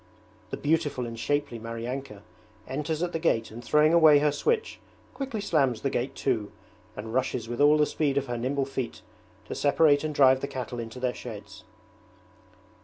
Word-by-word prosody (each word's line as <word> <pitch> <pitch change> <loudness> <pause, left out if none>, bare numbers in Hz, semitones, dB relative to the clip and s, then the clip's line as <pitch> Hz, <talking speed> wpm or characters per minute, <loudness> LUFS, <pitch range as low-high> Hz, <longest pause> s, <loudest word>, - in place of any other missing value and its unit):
The - - -4
beautiful 145 -4 0
and 115 - -6
shapely 145 -2 -1
Maryanka 115 -1 -6 0.4
enters 150 +4 -2
at 175 - -2
the 165 - -1
gate 115 -10 0
and 120 +2 -9
throwing 150 +5 +4
away 160 -3 +7
her 150 +1 +3
switch 450 - -1 0.3
quickly 270 -5 -4
slams 135 - +1
the 135 - -1
gate 130 +3 -2
to 115 -6 0 0.5
and 110 +2 -6
rushes 125 -3 -1
with 120 +3 -3
all 150 +1 +6
the 150 - +4
speed 145 -2 -1
of 140 - +1
her 120 -2 -4
nimble 135 +3 -1
feet 130 -5 -5 0.4
to - - -6
separate 145 0 +3
and 155 -1 -3
drive 130 -1 +5
the 140 - -2
cattle 125 -2 -5
into 115 +2 -7
their 125 -1 -1
sheds. 110 -4 -10
135 Hz, 180 wpm, -27 LUFS, 120-150 Hz, 0.5 s, away